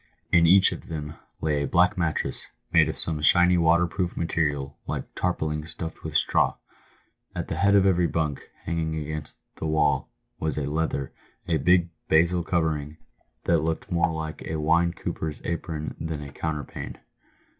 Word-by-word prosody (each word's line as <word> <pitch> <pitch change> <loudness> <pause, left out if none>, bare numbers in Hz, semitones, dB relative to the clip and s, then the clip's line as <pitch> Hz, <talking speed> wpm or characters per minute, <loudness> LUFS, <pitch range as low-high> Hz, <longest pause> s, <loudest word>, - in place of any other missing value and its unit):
In 85 -1 +6
each 95 +3 +6
of - - -7
them 75 -2 -5 0.3
lay 75 -2 +1
a 70 - -1
black 90 0 +3
mattress, 80 -4 -1 0.2
made - - +5
of - - -4
some 80 -2 -1
shiny 90 +3 +5
waterproof 85 +1 +2
material, 75 -4 -1
like - - -2
tarpauling 80 -4 -1
stuffed 80 0 -7
with - - -6
straw. - - +3 0.8
At - - -4
the 80 - -2
head 100 +3 +4
of 100 -1 +5
every 90 -2 +3
bunk, 75 -5 -2 0.2
hanging 80 -1 -1
against 75 -1 -5 0.2
the 80 - -3
wall, 75 -2 +2 0.3
was 80 -1 -2
a 75 - -1
leather, 75 -2 -2 0.3
a 80 - +2
big 90 +3 +3
" - - -47
basil" 85 +2 +4
covering, 80 -3 -1 0.5
that 85 -1 +3
looked 80 +1 -2
more 85 -1 +2
like 80 -1 -5
a 80 - -4
wine 80 +3 +3
cooper's 80 -3 -4
apron 80 -2 -3
than 80 -2 -4
a 70 - -9
counterpane. 75 -2 -4
80 Hz, 165 wpm, -26 LUFS, 75-85 Hz, 0.8 s, In